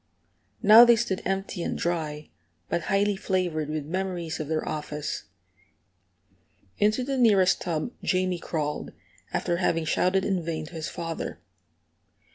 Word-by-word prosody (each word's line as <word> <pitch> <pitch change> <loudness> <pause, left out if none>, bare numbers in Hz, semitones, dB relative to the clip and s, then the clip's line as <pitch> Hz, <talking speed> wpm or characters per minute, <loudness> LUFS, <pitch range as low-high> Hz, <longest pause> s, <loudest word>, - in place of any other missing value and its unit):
Now 220 +3 +10
they 240 -1 +7
stood 220 -5 -1
empty 195 -1 -2
and - - -2
dry, 155 -3 -3 0.4
but 170 - -1
highly 200 +1 +2
flavored 175 -6 -1
with 155 -2 -3
memories 175 -1 -3
of 155 - -4
their 155 0 -2
office. 150 -1 -4 1.5
Into 215 +4 +2
the 270 0 -2
nearest 200 -6 +4
tub 165 +5 -2
Jamie 185 -1 0
crawled, 150 -3 -3 0.4
after 175 -1 0
having 165 -2 +1
shouted 185 +4 +2
in 190 -4 0
vain 160 -1 -3
to 160 - -13
his 160 -2 -4
father. 165 -1 -5
175 Hz, 135 wpm, -26 LUFS, 160-195 Hz, 1.5 s, Now